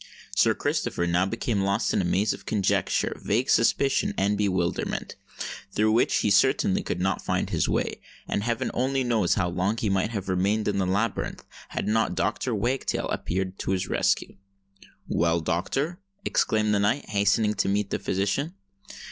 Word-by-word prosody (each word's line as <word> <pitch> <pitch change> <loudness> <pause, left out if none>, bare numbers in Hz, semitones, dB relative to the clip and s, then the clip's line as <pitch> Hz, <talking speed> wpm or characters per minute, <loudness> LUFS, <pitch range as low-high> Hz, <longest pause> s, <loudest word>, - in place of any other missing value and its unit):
Sir - - +4
Christopher 85 - -1
now 90 +2 +2
became 115 -1 -1
lost 100 +3 +1
in - - +2
a - - -1
maze 95 +4 +1
of 95 -1 -11
conjecture, 100 -3 +1
vague 120 +6 +1
suspicion, 135 +4 +2
and 100 +2 +2
bewilderment, 95 -4 -1 0.6
through 110 +2 +2
which 115 +3 +3
he 105 - +1
certainly 100 -2 +3
could 90 - -3
not 95 0 0
find - - -1
his - - +1
way; - - -1 0.3
and - - -1
heaven 120 +3 -1
only 130 +2 0
knows 115 -7 +2
how 90 - +1
long 90 +5 -1
he 105 -3 0
might 95 +2 +1
have 100 -5 -4
remained 100 +4 +1
in 100 -1 0
the 95 - +1
labyrinth, 100 +4 -1 0.3
had - - -3
not 110 -3 +1
Dr. 110 +7 -1
Wagtail 120 +6 -1
appeared 95 +1 -3
to - - -1
his 95 - -1
rescue. - - 0 0.7
"Well, 85 0 +1
doctor?" 135 - -1 0.3
exclaimed 110 -1 +2
the 100 - +2
knight, 110 +8 0
hastening 105 +1 +2
to 100 - 0
meet 100 0 0
the - - -1
physician. 100 - -1
100 Hz, 170 wpm, -26 LUFS, 95-115 Hz, 0.7 s, Sir